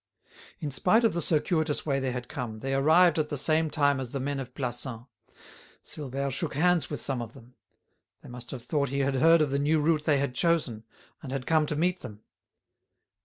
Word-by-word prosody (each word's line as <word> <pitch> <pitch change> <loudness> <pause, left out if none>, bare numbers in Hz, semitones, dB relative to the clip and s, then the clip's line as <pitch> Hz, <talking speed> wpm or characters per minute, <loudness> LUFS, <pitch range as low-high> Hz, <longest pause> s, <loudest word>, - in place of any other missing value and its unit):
In 150 -5 -4
spite 190 - +3
of 225 - +3
the 170 - -1
circuitous 160 -1 0
way 140 -3 0
they 130 -1 -2
had 125 0 -5
come, 120 -7 -6
they 135 0 -2
arrived 160 +4 +4
at 150 -1 -1
the 145 - -2
same 155 +3 +3
time 145 -3 +1
as 130 -2 -5
the 135 - -4
men 140 +1 -3
of 130 -1 -8
Plassans. 120 -2 -4 0.8
Silvère 140 -1 -4
shook 145 +2 -2
hands 175 +2 +2
with 145 - -4
some 130 -3 -2
of 115 -1 -8
them. 120 +2 -16 0.7
They - - -12
must 125 0 -10
have 125 -4 -7
thought 145 -1 -1
he 140 +1 -1
had 135 0 0
heard 165 +3 +5
of 145 - -2
the 140 - 0
new 155 +2 +2
route 155 0 +1
they 145 -2 +3
had 140 -2 -1
chosen, 130 -8 0 0.4
and 135 - -8
had 135 -2 -4
come 155 -2 +2
to 150 - -2
meet 175 +4 0
them. 105 0 -10
140 Hz, 215 wpm, -27 LUFS, 130-160 Hz, 0.8 s, heard